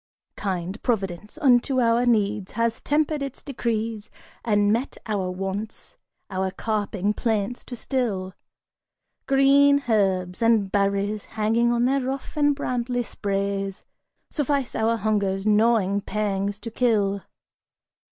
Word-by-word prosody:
Kind 190 0 -3
Providence 210 - -2
unto 260 -2 +4
our 235 0 +3
needs 210 -4 +1
has 230 -1 0
tempered 300 0 +1
its 275 -2 -5
decrees 230 -4 -3 0.3
And 205 -2 +3
met 245 +5 -2
our 200 -4 -1
wants, 195 +3 -5 0.4
our 190 0 -1
carping 205 -1 -1
plaints 220 +1 -1
to 245 - -7
still 220 -8 -2 0.9
Green 280 +1 +5
herbs, 190 -4 +1
and 225 -4 +3
berries 200 +1 0
hanging 225 +2 +1
on 240 0 +2
their 270 +2 +2
rough 265 +4 -4
and 290 -1 +3
brambly 245 -3 -1
sprays 195 -2 -3 0.5
Suffice 280 -3 -1
our 225 +1 +1
hunger's 200 -3 0
gnawing 210 -2 +3
pangs 200 -1 -2
to 230 - -6
kill. 205 -5 +1
215 Hz, 120 wpm, -24 LUFS, 200-245 Hz, 0.9 s, Green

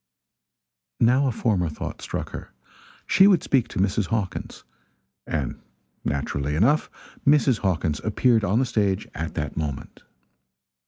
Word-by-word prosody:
Now 130 +4 +4
a - - +1
former 100 -7 0
thought 75 - -6
struck - - -5
her - - -8 0.5
she 190 - +6
would 190 -4 +4
speak 125 -4 +2
to - - -5
Mrs. 100 0 +1
Hawkins. 105 -3 -3 0.6
And 75 -6 -3 0.4
naturally 70 0 -2
enough 125 - +3 0.3
Mrs. 140 -5 +4
Hawkins 80 -6 -1
appeared 110 +1 +2
on 100 +2 +1
the 130 - +3
stage 105 -4 0
at 80 +1 -5
that 75 - -3
moment. 75 -4 -5
105 Hz, 130 wpm, -24 LUFS, 80-125 Hz, 0.6 s, she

